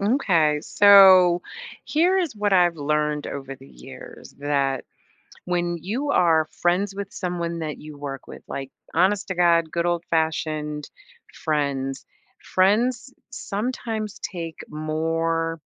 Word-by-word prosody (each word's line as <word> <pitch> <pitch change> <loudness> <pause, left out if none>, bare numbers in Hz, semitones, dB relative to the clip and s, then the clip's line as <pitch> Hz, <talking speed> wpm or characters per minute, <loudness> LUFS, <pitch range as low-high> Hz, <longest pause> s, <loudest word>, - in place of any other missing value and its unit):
M'kay, 175 - +2
so, 190 -3 +7 0.4
here 345 +5 +2
is 340 -9 -1
what 205 -1 -1
I've 175 -2 +3
learned 150 0 -1
over 135 -1 -6
the 135 +1 -16
years, - - -12
that 140 -2 -1 0.6
when 175 -1 -1
you 245 - -3
are 160 - +3 0.2
friends 185 +3 +1
with 200 0 -7
someone 170 -2 -3
that 155 -2 -4
you 150 -1 -11
work 140 -2 -7
with- - - -11
like, 135 -1 -5 0.2
honest 190 +4 +2
to 185 - -2
God, 170 -2 +3
good 170 +1 -1
old-fashioned 160 -3 -2 0.4
friends- 140 -3 -2 0.5
friends 230 +7 +2 0.2
sometimes 225 -3 -4
take 165 -4 -6
more 165 +1 -2
170 Hz, 120 wpm, -23 LUFS, 150-195 Hz, 0.6 s, so